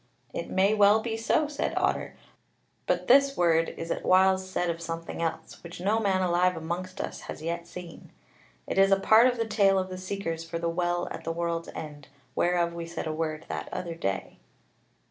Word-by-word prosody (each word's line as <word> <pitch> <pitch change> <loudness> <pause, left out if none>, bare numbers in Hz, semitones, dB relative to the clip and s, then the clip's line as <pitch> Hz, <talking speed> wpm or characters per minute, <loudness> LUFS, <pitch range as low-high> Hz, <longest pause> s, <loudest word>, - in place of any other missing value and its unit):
"It - - -4
may 195 +2 +3
well 210 0 +5
be 225 0 -3
so," 255 +7 +1
said 290 -1 -3
Otter; - - 0 0.7
"but 180 0 0
this 275 +2 +5
word 165 -1 +3
is 165 - -5
at - - -2
whiles 190 0 +4
said 180 -1 -1
of 170 0 -2
something 165 0 -5
else, 165 -1 -4
which 170 0 -10
no 205 +5 +1
man 190 -3 +1
alive 180 +1 +2
amongst 180 +4 -5
us - - -5
has 155 - -6
yet 170 +1 -3
seen. 175 -2 -10 0.5
It - - -1
is 195 0 +5
a 195 - +5
part 220 +5 +6
of 250 -1 0
the 230 - 0
tale 200 -3 +3
of 185 0 -1
the 185 0 -6
seekers 185 -4 -4
for 165 0 -5
the 170 0 -1
Well 175 +1 -1
at - - -6
the 165 - -2
World's 170 0 -2
End, 145 -2 -8 0.3
whereof 175 -1 +1
we 170 0 -6
said 170 - -5
a 155 - -2
word 155 -1 -3
that - - -5
other 170 -2 -4
day." 95 -12 -4
175 Hz, 205 wpm, -28 LUFS, 165-195 Hz, 0.7 s, part